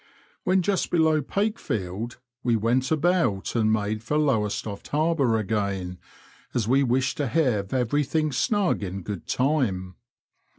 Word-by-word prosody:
When 185 0 +3
just 195 0 0
below 160 -2 +3
Pakefield 120 - -2 0.2
we 120 -2 +2
went 120 +4 +1
about 160 - +1
and 110 -2 +3
made 105 0 0
for 150 +7 -1
Lowestoft 110 -7 -1
Harbour 145 -6 +2
again, 100 -4 -2 0.6
as 115 -4 0
we 135 +3 +4
wished 130 0 +1
to 145 - 0
have 120 -12 +1
everything 145 +5 +1
snuo^ 190 - +1
in 95 -1 -5
good 100 -2 -6
time. 125 -10 0
125 Hz, 130 wpm, -25 LUFS, 105-155 Hz, 0.6 s, we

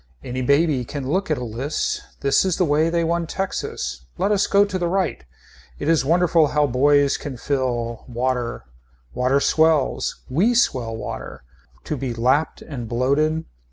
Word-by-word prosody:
Any 130 +1 -4
baby 140 0 +2
can 135 +2 -5
look 185 +7 0
at 155 - +1
a 125 - -4
list. 120 +6 -2 0.2
This 140 0 +3
is 185 -3 0
the 185 - +2
way 155 +2 +2
they 170 0 +1
won 170 0 0
Texas 185 - -4
Let 205 - +1
us 205 -1 +2
go 200 0 +4
to 190 -2 -3
the 175 - 0
right. 190 - -1 0.5
It 145 - -4
is 165 -3 +3
wonderful 165 +1 +3
how 150 0 +2
boys 140 +2 +3
can 135 -4 -7
fill. 120 -4 -2
Water. 125 - -2 0.5
Water 130 +2 +2
swells. 155 - +1
We 200 - +2
swell 120 - +1
water. 85 - -7 0.4
To 150 - -3
be 125 -2 -3
lapped 130 +7 +1
and 120 -7 -7
bloated. 150 +7 +1
145 Hz, 165 wpm, -22 LUFS, 125-165 Hz, 0.5 s, go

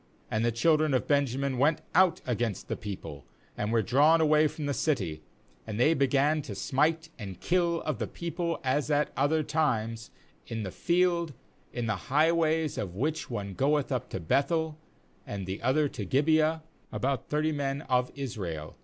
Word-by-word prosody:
^And 110 - 0
the 120 +1 +2
children 155 +4 +3
of 130 - 0
Benja 140 -3 +1
min 135 -2 -1
went 150 +3 +3
out 180 -1 +4
against 120 -4 -2
the - - -1
people, 90 -9 -7 0.3
and 105 +1 -2
were 115 -1 +2
drawn 145 - +4
away 155 -1 +4
from 150 0 -6
the 145 - 0
city; 95 - -1 0.5
and 105 - -4
they 150 +6 +5
began 140 +2 +2
to 150 - -7
smite 160 +3 0
and 95 -4 -7
kill 170 -1 +1
of 155 -4 -2
the - - -2
people, 170 0 -3
as 135 +3 0
at 150 0 +1
other 155 +3 +2
times, 115 -8 -1 0.4
in 115 -1 -4
the 95 - -4
field, 170 - +1 0.4
in 120 -1 -3
the 105 -5 -3
highways, 160 +1 +2
of 90 -3 -4
which 150 +9 -2
one 100 -5 -4
goeth 145 +6 +1
up 125 -4 -2
to - - -4
Beth 135 - +1
el, 160 -2 0 0.5
and 100 -5 -4
the 95 +2 -5
other 145 +5 +2
to 105 - -6
Gibeah, 155 - +2 0.3
about 135 -2 -2
thirty 155 +1 +1
men 140 0 -2
of 125 -2 +1
Israel. 95 - -5
140 Hz, 180 wpm, -29 LUFS, 115-155 Hz, 0.5 s, they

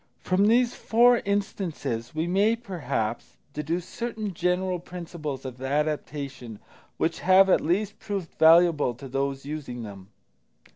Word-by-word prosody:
From 190 +3 +2
these 240 +2 +3
four 240 +2 +4
instances 180 - -3
we 160 +1 0
may, 200 +6 +2
perhaps, 165 - -4 0.2
deduce 165 +4 -3
certain 220 -4 -4
general 180 +1 0
principles 165 -6 -7
of 130 -1 -7
adaptation 140 -4 -3 0.4
which - - -1
have 190 +1 +5
at - - +4
least 195 +6 -1
proved 195 -5 -5
valuable 160 -5 +5
to 135 +3 -10
those 135 +1 -2
using 140 -5 -6
them. 100 -3 -10
170 Hz, 130 wpm, -26 LUFS, 135-195 Hz, 0.4 s, have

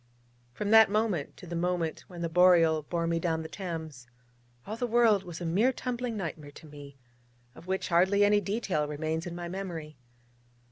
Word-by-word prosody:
From 205 - -3
that 220 -1 +8
moment 210 -8 -1
to - - -11
the 170 0 -6
moment 170 -1 -2
when 175 -2 -8
the - - 0
Boreal 165 -2 +4
bore 170 +3 -3
me 165 0 0
down 160 -1 -1
the - - -6
Thames, 160 -9 -7 0.6
all 215 - -5
the 245 +2 -2
world 230 -3 +4
was 175 -3 -8
a - - -3
mere 200 +10 +2
tumbling 245 -2 -4
nightmare 160 -6 -5
to 145 - -14
me, 145 -2 -12 0.6
of 160 +5 -15
which 190 0 -2
hardly 190 +4 +4
any 205 0 +3
detail 195 -8 -1
remains 160 +3 -3
in 170 - -6
my 175 0 -5
memory. 170 -5 -6
175 Hz, 185 wpm, -29 LUFS, 160-205 Hz, 0.6 s, that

